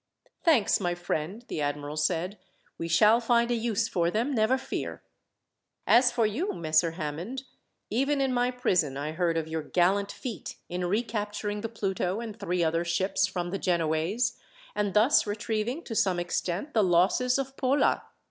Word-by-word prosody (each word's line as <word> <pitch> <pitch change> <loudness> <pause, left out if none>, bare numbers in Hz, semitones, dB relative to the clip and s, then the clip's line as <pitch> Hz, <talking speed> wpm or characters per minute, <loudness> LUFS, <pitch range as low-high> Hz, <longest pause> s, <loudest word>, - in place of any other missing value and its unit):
"Thanks, 280 -12 +4
my 175 -3 -1
friend," 175 +5 -3
the 155 - -3
admiral 145 0 -3
said. 175 +5 -1 0.4
"We 165 - -2
shall 210 +7 +5
find 235 0 +2
a - - +3
use 230 -3 0
for 170 -1 +1
them, 230 +9 0
never 230 +2 +3
fear. 265 - -5 0.8
"As 245 +1 +5
for 235 -2 +2
you, 280 - -1
Messer 160 0 +1
Hammond, 170 - -5 0.5
even 275 +6 +1
in 265 -1 +1
my 245 0 +2
prison 180 - 0
I 145 +2 -3
heard 165 0 0
of 160 -1 -2
your 160 0 -3
gallant 185 +6 +1
feat, 235 -8 -6
in 180 +1 -3
recapturing 210 0 -2
the 225 - -3
Pluto 195 -3 -2
and 225 -3 -6
three 180 0 0
other 165 +1 +1
ships 190 +3 +1
from 175 -2 -4
the 195 - -2
Genoese, 170 +5 0 0.3
and 205 -1 -1
thus 220 +3 +5
retrieving, 220 +7 -2
to 235 - -6
some 190 -4 +2
extent, 175 - -2
the 220 - +4
losses 190 +9 +3
of 270 0 -4
Pola. 270 +2 +2
200 Hz, 165 wpm, -28 LUFS, 170-235 Hz, 0.8 s, shall